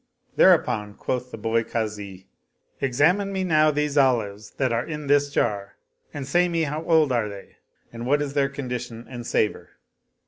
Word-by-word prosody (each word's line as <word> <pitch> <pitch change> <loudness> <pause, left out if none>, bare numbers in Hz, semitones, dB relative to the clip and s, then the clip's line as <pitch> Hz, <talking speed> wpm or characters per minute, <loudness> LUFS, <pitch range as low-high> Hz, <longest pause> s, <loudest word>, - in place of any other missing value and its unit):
Thereupon 105 -1 +3
quoth 125 0 -3
the 115 - -8
boy 115 +1 0
Kazi, 105 -5 -5 0.3
" - - -41
Examine 160 +10 +2
me 190 -1 -1
now 155 -4 +4
these 150 -1 +1
olives 110 -6 +1
that 130 -3 +1
are 115 +1 0
in 150 -2 -6
this 145 0 +3
jar 100 -7 -1 0.4
and 145 -2 -6
say 175 +5 +3
me 165 -1 0
how 155 +1 -3
old 160 -4 +4
are 115 -4 0
they 100 -1 -11 0.4
and 115 +1 -6
what 145 +2 +3
is 145 -1 -3
their 140 -1 +2
condition 125 -4 -6
and 120 -2 -8
savor." 105 - -1
130 Hz, 175 wpm, -24 LUFS, 115-150 Hz, 0.4 s, now